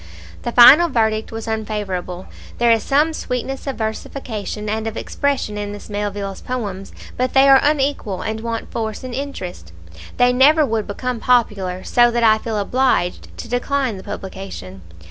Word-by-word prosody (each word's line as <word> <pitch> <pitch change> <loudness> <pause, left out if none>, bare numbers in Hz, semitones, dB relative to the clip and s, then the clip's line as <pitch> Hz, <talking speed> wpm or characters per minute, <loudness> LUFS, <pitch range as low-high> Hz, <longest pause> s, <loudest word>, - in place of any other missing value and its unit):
The 240 - -3
final 280 +9 +8
verdict 220 -4 0
was 225 0 -6
unfavourable: 205 -5 -4 0.3
"There 235 -1 +3
is 225 -1 +3
some 300 +6 +2
sweetness 265 -1 -4
of 270 - -2
versification 220 -1 -5
and 220 +1 -2
of 225 - -5
expression 270 -7 -2
in 205 0 -4
Miss 205 +1 -10
Melville's 205 -1 -4
poems, 205 -6 -5 0.3
but 255 +1 -1
they 270 +1 +6
are 270 -1 +8
unequal, 280 -9 0
and 220 0 -3
want 230 0 -5
force 220 0 -4
and 255 -1 -6
interest. 235 - -6 0.5
They 245 0 +4
never 295 +5 +5
would 225 -4 -2
become 250 +4 -3
popular, 200 -7 +1
so 240 -1 +4
that 235 0 0
I 220 -1 +5
feel 220 -1 -3
obliged 245 -3 0
to - - -7
decline 245 -1 -1
the 190 - -10
publication. 190 - -8
225 Hz, 165 wpm, -20 LUFS, 205-255 Hz, 0.5 s, final